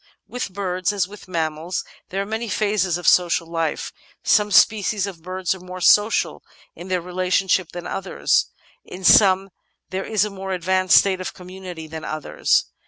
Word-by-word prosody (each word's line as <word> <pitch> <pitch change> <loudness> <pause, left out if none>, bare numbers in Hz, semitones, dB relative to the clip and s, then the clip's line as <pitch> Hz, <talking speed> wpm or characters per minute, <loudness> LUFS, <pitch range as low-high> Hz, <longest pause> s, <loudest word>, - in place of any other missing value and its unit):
With 245 -5 -5
birds, 185 -1 -1
as 200 -3 0
with 205 0 -13
mammals, 165 0 -3 0.2
there 195 +1 -2
are - - -8
many 220 +2 -4
phases 200 -5 0
of 175 - -5
social 175 -1 +4
life. 165 -2 -3 0.3
Some 210 -1 +3
species 210 -1 +3
of 185 -5 -8
birds 185 +2 -2
are 190 - -10
more 180 +1 -9
social 205 +4 +3 0.3
in 175 - -10
their 185 -1 -1
relationship 185 0 0
than 175 0 -7
others; 195 +1 0 0.4
in 185 +1 -10
some 195 0 +5 0.4
there 190 +1 -2
is 215 -2 +1
a 210 - -5
more 190 -1 -5
advanced 185 +1 +3
state 190 -2 +3
of 185 - -6
community 180 -2 -9
than 160 0 -8
others. 155 -1 0
185 Hz, 170 wpm, -22 LUFS, 175-195 Hz, 0.4 s, some